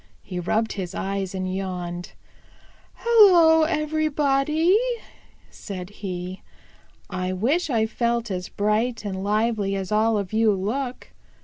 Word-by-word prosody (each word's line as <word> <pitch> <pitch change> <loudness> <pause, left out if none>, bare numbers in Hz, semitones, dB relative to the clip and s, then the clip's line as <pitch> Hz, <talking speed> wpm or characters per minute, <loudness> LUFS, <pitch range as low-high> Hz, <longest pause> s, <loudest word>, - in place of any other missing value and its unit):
He 180 -3 -5
rubbed 220 +6 0
his 185 -2 -5
eyes 195 -1 -3
and 185 0 -3
yawned. 180 -2 -5 0.8
"Hello, 355 -9 +6
everybody," 305 +1 +1 0.8
said 185 -1 -8
he. 185 -1 -5 0.7
"I 185 0 -2
wish 275 - 0
I 225 -4 +2
felt 235 0 -1
as 180 -1 -4
bright 215 +2 0
and 190 -1 -4
lively 210 -1 0
as 190 -1 -4
all 220 +1 +3
of 200 0 -4
you 220 -1 +4
look. 245 +7 -4
215 Hz, 120 wpm, -24 LUFS, 190-275 Hz, 0.8 s, Hello